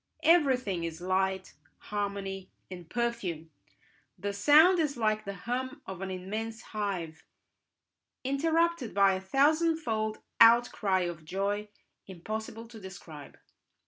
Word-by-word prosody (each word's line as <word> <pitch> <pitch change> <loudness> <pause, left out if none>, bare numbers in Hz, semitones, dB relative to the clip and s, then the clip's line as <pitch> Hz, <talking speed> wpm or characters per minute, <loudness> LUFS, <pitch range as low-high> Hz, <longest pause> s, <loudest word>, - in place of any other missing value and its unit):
Everything 260 - +3
is 165 -1 -4
light, 190 +1 -1 0.2
harmony, 200 -2 -4 0.2
and 175 -3 -9
perfume; 205 -10 -3 0.7
the 200 +3 -3
sound 310 - +6
is 295 -4 0
like 215 -1 0
the 200 0 -5
hum 260 +4 -3
of 190 -1 -7
an 195 - -4
immense 215 +5 -5
hive, 190 -7 -3 1.0
interrupted 320 -1 0
by 195 -1 +5
a 190 - -3
thousandfold 275 - +1 0.2
outcry 230 -5 +5
of 175 -3 -4
joy 200 +5 -2 0.4
impossible 220 +5 -6
to 225 -1 -12
describe. 170 -7 -11
210 Hz, 110 wpm, -30 LUFS, 190-245 Hz, 1.0 s, sound